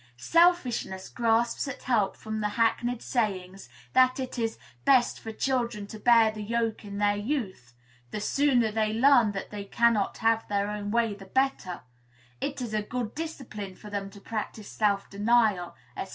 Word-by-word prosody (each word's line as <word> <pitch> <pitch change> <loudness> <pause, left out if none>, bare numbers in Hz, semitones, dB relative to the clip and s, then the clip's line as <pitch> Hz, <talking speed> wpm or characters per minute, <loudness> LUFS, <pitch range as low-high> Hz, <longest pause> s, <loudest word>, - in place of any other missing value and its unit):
Selfishness 255 - +2
grasps 235 +2 +1
at 275 - -7
help 210 -6 +1
from 220 0 -4
the 210 - 0
hackneyed 230 +2 0
sayings, 195 -5 -2 0.2
that 255 +1 +4
it 255 -1 -4
is 225 -1 -1 0.3
"best 255 -3 +4
for 225 - -7
children 235 -3 -1
to 215 +2 -9
bear 230 -1 +5
the 215 0 -7
yoke 225 +1 -1
in 200 -1 -7
their 205 0 +2
youth;" 205 - -4 0.3
"the 210 - -4
sooner 245 0 +2
they 215 0 0
learn 240 -2 +5
that 195 - -6
they 205 -1 -5
cannot 225 0 +2
have 225 0 +1
their 200 0 0
own 205 -1 -4
way 230 -1 +1
the 200 -1 -11
better;" 260 -7 -1 0.6
"it 280 -2 -3
is 225 -3 -5
a 215 - +1
good 230 +1 -4
discipline 265 -11 -6
for 210 +2 -12
them 200 -1 -3
to 200 - -13
practise 215 0 -5
self 200 -2 +1
denial," 210 -3 +2 0.3
&c. 195 - -12
220 Hz, 170 wpm, -28 LUFS, 205-240 Hz, 0.6 s, bear